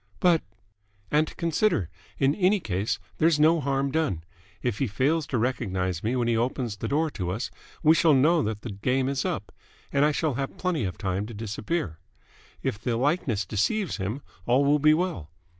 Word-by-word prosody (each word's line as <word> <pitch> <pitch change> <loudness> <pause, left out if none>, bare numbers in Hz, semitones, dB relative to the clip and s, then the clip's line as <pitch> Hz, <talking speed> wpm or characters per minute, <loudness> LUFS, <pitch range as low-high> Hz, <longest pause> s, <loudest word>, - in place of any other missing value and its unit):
"But 175 -3 +4 0.4
?" 100 -1 -37
"And, 155 +1 +1
consider. 170 - +1 0.3
In 135 +1 +3
any 195 +3 +3
case, 100 - -1 0.2
there's 160 -1 +4
no 160 +2 +5
harm 135 -1 0
done. 140 - 0 0.4
If 120 -4 -1
he 135 - +1
fails 140 +8 +1
to 130 - -1
recognise 95 -7 -1
me 115 +4 0
when 120 -2 +1
he 120 - +2
opens 120 -1 -1
the - - -4
door 155 +2 +1
to 90 -8 -3
us, 110 +3 -3 0.3
we 155 0 +7
shall 160 -2 +5
know 155 +5 +4
that 105 -3 -3
the 115 - -5
game 125 +7 0
is 135 -1 -1
up: - - -3 0.4
and 140 0 +4
I 150 - +4
shall 150 -1 0
have 135 +2 -4
plenty 175 - 0
of 90 - -4
time 95 +1 -2
to 115 - -8
disappear. 105 - -3 0.6
If 100 - -1
the 115 0 -1
likeness 130 - 0
deceives 165 - 0
him, 110 +7 -3 0.2
all 130 +4 +4
will 145 +1 +4
be 155 +2 +5
well. 170 - -2
130 Hz, 190 wpm, -26 LUFS, 105-155 Hz, 0.6 s, we